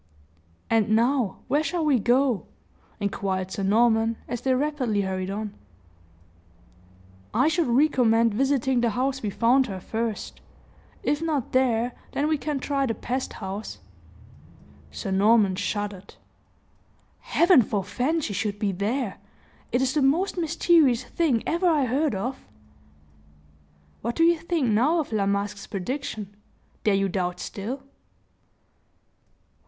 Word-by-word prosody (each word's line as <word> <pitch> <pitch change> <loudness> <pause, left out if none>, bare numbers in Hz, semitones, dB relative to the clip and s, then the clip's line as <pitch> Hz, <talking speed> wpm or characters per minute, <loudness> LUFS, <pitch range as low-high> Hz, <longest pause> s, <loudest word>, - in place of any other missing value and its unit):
"And 225 -2 +2
now, 240 -2 +1
where 295 - +2
shall 320 +2 -1
we 280 -5 +3
go?" 245 0 +2 0.5
inquired 190 -2 -2
Sir 200 - -4
Norman, 225 +2 +3
as 240 -1 -4
they 260 0 +2
rapidly 255 -7 0
hurried 190 -1 -3
on. 205 +1 -4 1.8
"I 255 +6 +4
should 325 -1 +1
recommend 235 -4 +3
visiting 265 0 +1
the 235 - +2
house 265 +4 -1
we 210 - -2
found 245 +6 +3
her 190 -3 -5
first; 225 +2 -4 0.6
if 295 +1 0
not 310 -6 -1
there, 245 -2 +2 0.2
then 290 - 0
we 310 -2 +1
can 295 -2 -2
try 275 0 -1
the 225 - -1
pest 255 +2 -3
house." 195 +3 -6 1.1
Sir 75 - -5
Norman 200 0 +4
shuddered. 200 0 -4 1.0
"Heaven 340 -5 +4
forefend 245 - -1
she 205 - -3
should 205 +1 -2
be 205 -1 0
there! 205 +3 -2 0.5
It 250 +2 +2
is 265 0 0
the 300 - +1
most 310 +9 +2
mysterious 325 -6 +3
thing 255 -3 0
ever 340 +2 +1
I 300 -5 +3
heard 270 +1 0
of!" 250 +7 -4 1.6
"What 235 +2 -3
do 330 - +3
you 335 0 +4
think 330 -5 -1
now 250 +10 +3
of 300 - -3
La 205 -3 0
Masque's 200 0 -2
prediction 210 -1 -5 0.5
dare 210 -2 +3
you 195 0 +1
doubt 180 -1 -2
still?" 235 +9 -5
240 Hz, 135 wpm, -25 LUFS, 205-280 Hz, 1.8 s, I